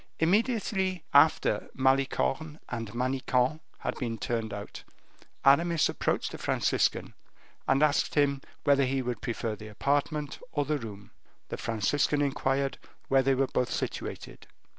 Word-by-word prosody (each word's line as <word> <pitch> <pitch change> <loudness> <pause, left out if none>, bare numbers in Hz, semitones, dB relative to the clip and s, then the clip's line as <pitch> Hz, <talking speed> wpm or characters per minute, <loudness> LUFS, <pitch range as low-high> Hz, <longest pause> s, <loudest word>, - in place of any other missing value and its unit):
Immediately 190 -1 +1
after - - +4
Malicorne 135 +3 +1
and 115 -3 -4
Manicamp 130 +3 0 0.2
had - - -2
been 115 -4 -2
turned 115 0 -2
out, 100 0 -7 0.6
Aramis 165 +4 +4
approached - - -1
the - - -8
Franciscan, - - 0 0.5
and 135 +2 +3
asked 150 -1 +2
him 140 -2 +2 0.2
whether 140 -2 +4
he 135 0 -1
would 120 -3 -3
prefer 115 -2 -2
the 110 +1 -10
apartment 145 +6 -1
or 145 -1 0
the 150 +1 0
room. 105 -4 -9 0.4
The - - -4
Franciscan 145 +6 +1
inquired 135 -1 0 0.3
where 135 0 +5
they 135 +1 +2
were 135 +1 +2
both 125 -1 -1
situated. - - -5
135 Hz, 135 wpm, -29 LUFS, 120-150 Hz, 0.6 s, where